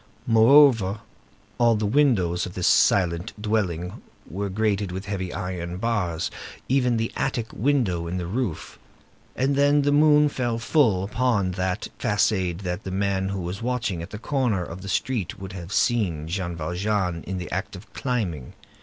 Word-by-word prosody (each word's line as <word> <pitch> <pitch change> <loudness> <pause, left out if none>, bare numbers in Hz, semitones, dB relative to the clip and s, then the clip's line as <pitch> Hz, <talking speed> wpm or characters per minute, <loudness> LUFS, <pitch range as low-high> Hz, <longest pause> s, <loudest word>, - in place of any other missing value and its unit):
Moreover, 115 -4 +5 0.6
all 120 -1 +4
the 105 0 -1
windows 100 -9 +2
of 90 - -10
this 90 - -1
silent 90 +2 +2
dwelling 95 -5 -2 0.3
were 100 +6 -4
grated 100 -1 0
with 95 +3 -5
heavy 95 -3 -3
iron 90 -2 -4
bars, 95 -7 -1 0.4
even 125 -3 +2
the 115 0 -1
attic 120 -4 -2
windows 105 -10 0
in 90 - -3
the 90 - -3
roof. 100 -2 -4 0.6
And 135 +2 +1
then, 145 +1 +4
the 145 - +2
moon 150 0 +5
fell 120 -5 -2
full 115 - +2
upon 105 -3 0
that 95 +2 -2
façade, 95 -3 0
and 90 +2 -2
the 95 - -6
man 95 0 0
who 100 -1 -3
was 90 +3 -5
watching 120 -7 -2
at 85 - -7
the 105 - -7
corner 120 -6 0
of 85 +1 -8
the 95 - -7
street 110 0 -1
would 95 0 -8
have 90 -1 -8
seen 90 -11 +1
Jean 85 0 -3
Valjean 90 +2 -2
in 95 +1 -4
the 90 - -6
act 95 +1 -3
of 95 +4 -13
climbing. 95 - -3
100 Hz, 165 wpm, -24 LUFS, 90-120 Hz, 0.6 s, Moreover